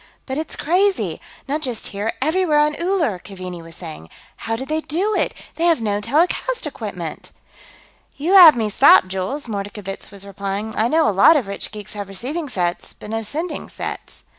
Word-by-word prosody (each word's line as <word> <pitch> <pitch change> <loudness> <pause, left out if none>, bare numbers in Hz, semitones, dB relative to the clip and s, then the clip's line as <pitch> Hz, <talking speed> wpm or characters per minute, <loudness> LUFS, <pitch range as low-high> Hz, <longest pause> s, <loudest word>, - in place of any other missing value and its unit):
"But 265 +2 -3
it's 315 - -5
crazy! 375 +5 +1 0.3
Not 295 +3 -1
just 250 -6 -3
here; 205 +3 -3
everywhere 320 0 +2
on 300 0 +3
Uller!" 340 - 0
Keaveney 185 -3 -8
was 165 0 -13
saying. 155 - -9 0.3
"How 225 - -3
did 265 +4 -5
they 310 +1 -1
do 370 +8 -1
it? - - +1 0.3
They 335 - +1
have 335 -5 +4
no 205 -2 -1
telecast 345 - +1
equipment." - - -6 0.9
"You 325 +7 0
have 350 -7 +10
me 220 -2 +1
stopped, 185 - +6
Jules," 190 +10 -3
Mordkovitz 200 -2 -5
was 200 0 -7
replying. 200 +2 -4
"I 220 - +2
know 315 +4 +3
a - - +3
lot 200 - +7
of 265 - -1
rich 200 0 -5
geeks 210 -2 -9
have 205 -2 -5
receiving 280 - -4
sets, 175 -6 -2
but 210 - -10
no 225 0 -1
sending 305 - -4
sets." - - -7
230 Hz, 185 wpm, -21 LUFS, 200-315 Hz, 0.9 s, have